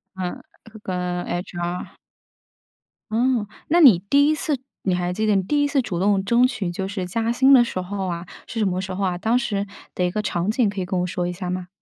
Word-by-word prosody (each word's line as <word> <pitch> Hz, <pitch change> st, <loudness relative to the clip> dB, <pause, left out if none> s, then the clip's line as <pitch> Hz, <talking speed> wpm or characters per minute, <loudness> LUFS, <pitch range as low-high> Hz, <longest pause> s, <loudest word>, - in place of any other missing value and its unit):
嗯， 185 Hz, -1 st, -4 dB, 0.3 s
是 220 Hz, -, -11 dB
跟 180 Hz, -2 st, -3 dB
HR。 175 Hz, 0 st, -4 dB, 1.2 s
哦， 235 Hz, -1 st, +2 dB, 0.2 s
那 340 Hz, +3 st, +4 dB
你 225 Hz, -, +8 dB
第 285 Hz, 0 st, +5 dB
1 -, -, +3 dB
次 300 Hz, -1 st, -1 dB, 0.3 s
你 185 Hz, -2 st, +1 dB
还 180 Hz, 0 st, -1 dB
记 215 Hz, +4 st, -1 dB
得 210 Hz, -2 st, +3 dB
你 190 Hz, -, +2 dB
第 290 Hz, +10 st, +1 dB
1 290 Hz, -, +3 dB
次 285 Hz, -2 st, +2 dB
主 175 Hz, -7 st, -4 dB
动 195 Hz, 0 st, +2 dB
争 235 Hz, +5 st, +4 dB
取 205 Hz, -9 st, -3 dB
就 190 Hz, +2 st, -3 dB
是 195 Hz, -2 st, -3 dB
加 225 Hz, +5 st, -1 dB
薪 265 Hz, +3 st, +5 dB
的 255 Hz, -, +8 dB
时 210 Hz, -6 st, -1 dB
候 190 Hz, +1 st, -4 dB
啊， 170 Hz, 0 st, -4 dB, 0.2 s
是 230 Hz, -, -7 dB
什 215 Hz, -, +2 dB
么 185 Hz, -1 st, 0 dB
时 190 Hz, 0 st, -4 dB
候 195 Hz, +2 st, -3 dB
啊？ 180 Hz, -2 st, 0 dB
当 220 Hz, +6 st, +1 dB
时 205 Hz, -6 st, -1 dB, 0.3 s
的 180 Hz, -, 0 dB
一 180 Hz, -, +1 dB
个 215 Hz, +3 st, -1 dB
场 180 Hz, -2 st, -1 dB
景， 225 Hz, -1 st, +2 dB
可 200 Hz, -1 st, -5 dB
以 185 Hz, -, -1 dB
跟 185 Hz, 0 st, -2 dB
我 -, -, 0 dB
说 175 Hz, 0 st, -2 dB
一 180 Hz, -, -3 dB
下 180 Hz, 0 st, -5 dB
吗？ 180 Hz, 0 st, -3 dB
195 Hz, 255 characters per minute, -23 LUFS, 180-230 Hz, 1.2 s, 你